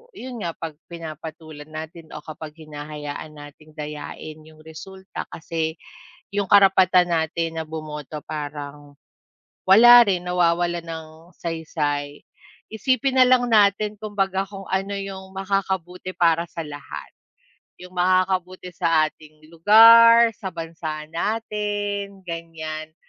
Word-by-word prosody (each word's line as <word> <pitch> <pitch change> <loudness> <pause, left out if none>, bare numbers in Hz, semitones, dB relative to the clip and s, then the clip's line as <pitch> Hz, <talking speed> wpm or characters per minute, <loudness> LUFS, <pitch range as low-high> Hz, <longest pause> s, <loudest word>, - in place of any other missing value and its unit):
'yun 250 -1 -8
nga, 170 -5 -4
'pag 160 -2 -7
pinapatulan 160 -2 -9
natin 160 +1 -9
o 150 - -8
kapag 155 -1 -9
hinahayaan 150 0 -7
natin 150 +1 -14
dayain 150 0 -7
'yung 155 0 -17
resulta 190 +4 -9
kasi 160 -1 -4 0.6
'yung 200 -1 -1
karapatan 185 -3 +5
natin 165 0 -1
na 160 - -4
bumoto 150 -1 -7
parang 145 -1 -7 0.8
wala 240 +4 +10
rin 180 -3 0
nawawalan 175 -1 +1
ng 160 -1 -6 0.3
saysay. 150 -3 -3 0.5
Isipin 260 +4 0
na 255 - +8
lang 250 -1 +4
natin 210 -1 +3
kumbaga 195 -2 -1
kung 195 -1 -9
ano 195 +1 -1
'yung 190 -1 -7
makakabuti 190 -2 -3
para 170 0 +2
sa 170 -1 -6
lahat, 145 -1 -9 0.7
'yung 180 0 -12
makakabuti 185 0 +1
sa 165 -3 +2
ating 155 0 -19
lugar, 230 +6 +8
sa 190 - -5
bansa 165 -2 -5
natin, 205 0 -3
ganiyan, 160 -2 -6
170 Hz, 115 wpm, -23 LUFS, 155-195 Hz, 0.8 s, wala